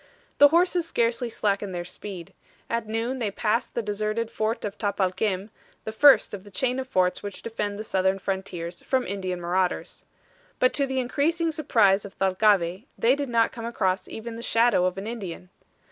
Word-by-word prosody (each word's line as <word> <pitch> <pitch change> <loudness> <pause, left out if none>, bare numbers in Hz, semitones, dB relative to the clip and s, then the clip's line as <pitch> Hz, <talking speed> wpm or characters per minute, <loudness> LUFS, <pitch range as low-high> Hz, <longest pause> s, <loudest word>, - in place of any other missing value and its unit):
The 290 - +10
horses 345 +2 +2
scarcely 235 -3 0
slackened 200 -3 -1
their 175 0 -4
speed. 190 0 -8 0.4
At 230 -1 -1
noon 230 +4 -2
they 225 -4 0
passed 220 +4 -1
the 235 - -1
deserted 215 +2 -2
fort 220 0 -2
of 205 -1 -4
Tapalquem, 200 0 -1 0.3
the 220 - -4
first 275 +3 +6
of 195 -2 -6
the 205 - -13
chain 255 +4 -1
of 260 - -4
forts 185 -6 +1
which 205 -1 -7
defend 210 -3 -3
the 215 - -5
southern 190 -2 +1
frontiers 185 -3 -4
from 260 -1 0
Indian 185 -2 -3
marauders. 180 +1 -1 0.5
But 255 - +3
to 280 -1 +1
the 265 0 -1
increasing 320 +6 0
surprise 210 -10 +3
of 200 0 -10
Thalcave, 190 0 +2
they 245 +3 +4
did 285 -2 -3
not 230 -1 +3
come 230 -1 -7
across 190 -5 -1
even 225 +1 -7
the - - -7
shadow 230 -5 +3
of 185 0 -1
an 195 - -5
Indian. 190 -6 -6
215 Hz, 180 wpm, -26 LUFS, 190-240 Hz, 0.5 s, The